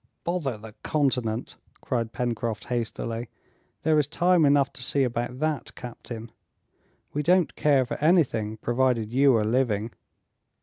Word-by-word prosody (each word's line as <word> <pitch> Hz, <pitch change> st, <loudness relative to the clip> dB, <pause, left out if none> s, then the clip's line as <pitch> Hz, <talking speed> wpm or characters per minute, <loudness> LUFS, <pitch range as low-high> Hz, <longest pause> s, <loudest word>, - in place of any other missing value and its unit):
"Bother 165 Hz, -9 st, -1 dB
the 110 Hz, 0 st, -11 dB
continent," 125 Hz, -6 st, -1 dB, 0.2 s
cried 115 Hz, -3 st, -2 dB
Pencroft 115 Hz, -3 st, -2 dB
hastily; 115 Hz, -1 st, -3 dB, 0.5 s
"there 155 Hz, -1 st, +4 dB
is 145 Hz, -, +1 dB
time 175 Hz, +1 st, +3 dB
enough 140 Hz, -1 st, +3 dB
to -, -, -10 dB
see 135 Hz, +3 st, +1 dB
about 120 Hz, 0 st, -2 dB
that, 150 Hz, -2 st, -2 dB
captain! 115 Hz, -2 st, -8 dB, 0.8 s
we 150 Hz, -, 0 dB
don't 180 Hz, +2 st, +3 dB
care 140 Hz, -3 st, +3 dB
for -, -, -4 dB
anything, 130 Hz, -, +2 dB
provided 120 Hz, -1 st, 0 dB
you 135 Hz, 0 st, +5 dB
are 110 Hz, -, +2 dB
living." 115 Hz, -2 st, +1 dB
125 Hz, 135 wpm, -26 LUFS, 115-145 Hz, 0.8 s, you